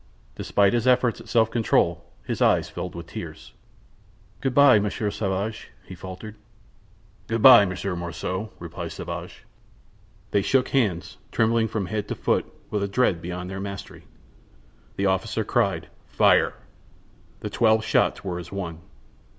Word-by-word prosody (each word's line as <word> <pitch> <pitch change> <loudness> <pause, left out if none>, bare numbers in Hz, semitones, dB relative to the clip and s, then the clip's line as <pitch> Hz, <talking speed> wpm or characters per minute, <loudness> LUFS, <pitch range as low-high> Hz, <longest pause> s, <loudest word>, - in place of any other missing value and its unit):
Despite 100 -1 +2
his 120 +1 +1
efforts 125 -2 +3
at - - -14
self 115 -2 +3
control 115 -2 +1 0.2
his - - -3
eyes - - +3
filled 90 - -6
with 85 -1 -7
tears. 85 - -9 0.9
"Good 135 -2 -2
by, 140 -6 +7
Monsieur 105 +1 -2
Sauvage," 100 +2 -3 0.2
he - - -10
faltered. 95 +4 -9 0.9
"Good 115 -1 -1
by, 120 -6 +10
Monsieur 95 0 -3
Morissot," 90 +4 -4
replied 85 0 -7
Sauvage. 85 +1 -7 0.9
They 100 - +3
shook 130 +5 +2
hands, 105 -11 0
trembling 115 0 +2
from 110 -3 -3
head 105 +2 -3
to - - -3
foot - - 0 0.2
with 105 - -1
a 100 - 0
dread 100 -5 +1
beyond 90 +1 -5
their 95 - -5
mastery. 100 -1 -8 0.9
The 100 - -1
officer 95 -2 0
cried: - - 0 0.2
"Fire!" - - +3 0.9
The - - -5
twelve 110 -1 +3
shots 115 - +1
were 90 -3 -3
as 85 -1 -9
one. 90 -5 -5
100 Hz, 145 wpm, -24 LUFS, 90-110 Hz, 0.9 s, by